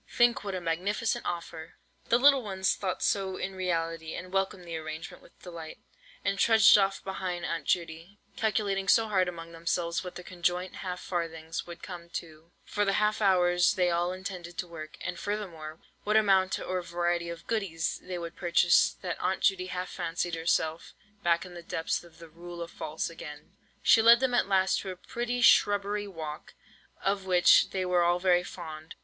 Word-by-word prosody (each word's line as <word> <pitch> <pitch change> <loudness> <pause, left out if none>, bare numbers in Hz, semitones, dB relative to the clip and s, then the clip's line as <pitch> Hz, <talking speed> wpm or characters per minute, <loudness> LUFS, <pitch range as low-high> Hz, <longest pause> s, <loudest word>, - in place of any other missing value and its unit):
Think 240 -2 +3
what 200 -2 -4
a 185 - -3
magnificent 190 +7 -1
offer!" 170 -2 -6 0.3
The 235 - +5
little 275 +1 +6
ones 190 -4 0
thought 185 -2 -3
so 190 -2 0
in 195 - -4
reality, 165 -3 -2
and 185 +1 -8
welcomed 195 -2 -1
the 170 -1 -5
arrangement 155 0 -7
with - - -21
delight, 165 -3 -8 0.5
and 195 0 0
trudged 220 -2 +7
off 195 -1 +2
behind 185 -2 -4
Aunt 165 -4 -3
Judy, 170 +2 -2 0.2
calculating 200 -3 0
so 225 +3 +4
hard 190 -3 +2
among 165 -1 -7
themselves 170 +1 -2
what 180 - -8
their 180 - -8
conjoint 180 0 -2
half 180 -2 -5
farthings 165 -2 -4
would 170 -1 -10
come 175 -2 -8
to, 160 0 -11
for 205 - -1
the 195 -1 +1
half 210 +1 +1
hours 180 -3 +4
they 180 -1 +2
all 175 +1 +1
intended 185 -2 -7
to 180 - -3
work, 155 -2 -9
and - - -4
furthermore, 170 -7 -5 0.2
what 210 +1 +3
amount 190 -3 +3
or 185 0 -2
variety 175 0 -1
of 170 0 -8
"goodies" 180 -7 -2
they 185 -1 -5
would 170 -1 -6
purchase, 175 0 +4
that 180 -2 -3
Aunt 185 +1 -1
Judy 185 -2 +2
half 185 0 -4
fancied 170 +1 -3
herself 165 0 -1 0.3
back 170 -1 +2
in 180 - -11
the 175 - -8
depths 165 0 -2
of 170 -2 -17
the 165 -1 -12
"Rule 170 +2 -8
of 170 - -10
False" 155 +1 -4
again! 150 -2 -10 0.3
She 225 - +6
led 235 +1 +8
them 260 -1 0
at 245 - +2
last 190 -1 +2
to 195 - -6
a 185 - -5
pretty 240 +6 -3
shrubbery 205 -2 +4
walk, 160 -5 -8 0.5
of 195 -1 0
which 180 -1 +6
they 190 -1 -2
were 180 -1 +2
all 175 0 +3
very 180 -1 +3
fond. 160 -3 -9
180 Hz, 185 wpm, -29 LUFS, 170-195 Hz, 0.5 s, led